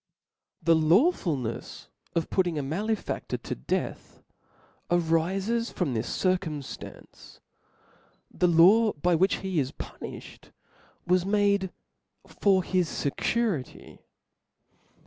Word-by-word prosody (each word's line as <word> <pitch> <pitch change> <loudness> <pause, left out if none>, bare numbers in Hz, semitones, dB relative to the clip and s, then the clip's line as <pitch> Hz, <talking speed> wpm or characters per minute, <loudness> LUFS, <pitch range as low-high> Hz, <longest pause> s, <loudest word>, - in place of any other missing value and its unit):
" - - -42
The 165 +1 +5
lawfulnefs 160 - +1 0.3
of 165 -1 -1
putting 175 -4 +1
a 145 - -1
malefadlor 205 +10 -3
to - - -4
death, - - -4 0.7
arifes 185 +7 +1
from 160 -8 -1
this 110 - -2
circumftance, 175 -7 -4 0.9
the 180 - +1
la^, 185 +3 +5
by 175 +3 +2
which 185 +4 +3
he 185 -4 0
is 130 -2 -1
punilhed, - - -9 0.6
was 180 0 +3
made 200 -1 +2 0.6
for 190 -2 +2
his 180 -1 +1
fecuricy. 175 - -2
180 Hz, 100 wpm, -27 LUFS, 160-200 Hz, 0.9 s, The